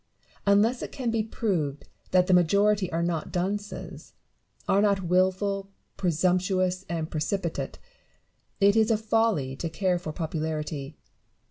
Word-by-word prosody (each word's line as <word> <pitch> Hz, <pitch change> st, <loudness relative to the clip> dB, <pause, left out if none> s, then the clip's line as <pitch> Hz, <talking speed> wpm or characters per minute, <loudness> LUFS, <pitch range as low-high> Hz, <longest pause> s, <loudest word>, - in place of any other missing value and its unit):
Unless 215 Hz, +5 st, +4 dB
it -, -, -5 dB
can 250 Hz, -4 st, -2 dB
be 225 Hz, -1 st, +1 dB
proved 180 Hz, -10 st, -2 dB, 0.2 s
that 180 Hz, -1 st, +4 dB
the 185 Hz, -, +2 dB
majority 200 Hz, +2 st, +3 dB
are 165 Hz, +1 st, 0 dB
not 170 Hz, -2 st, -2 dB
dunces 205 Hz, +3 st, -4 dB, 0.3 s
— -, -, -34 dB
are 200 Hz, -, +4 dB
not 200 Hz, -2 st, +2 dB
wilful, 190 Hz, +2 st, +1 dB, 0.3 s
presumptuous, 185 Hz, +1 st, +1 dB
and 165 Hz, -2 st, -3 dB
precipitate 170 Hz, +2 st, -2 dB, 0.4 s
— -, -, -45 dB, 0.3 s
it 200 Hz, +1 st, +5 dB
is 220 Hz, 0 st, +4 dB
a 225 Hz, -, +3 dB
folly 220 Hz, -11 st, +1 dB
to 165 Hz, -, -3 dB
care 180 Hz, +2 st, 0 dB
for 160 Hz, -3 st, -5 dB
popularity. 155 Hz, -2 st, -4 dB
185 Hz, 140 wpm, -27 LUFS, 165-205 Hz, 0.4 s, it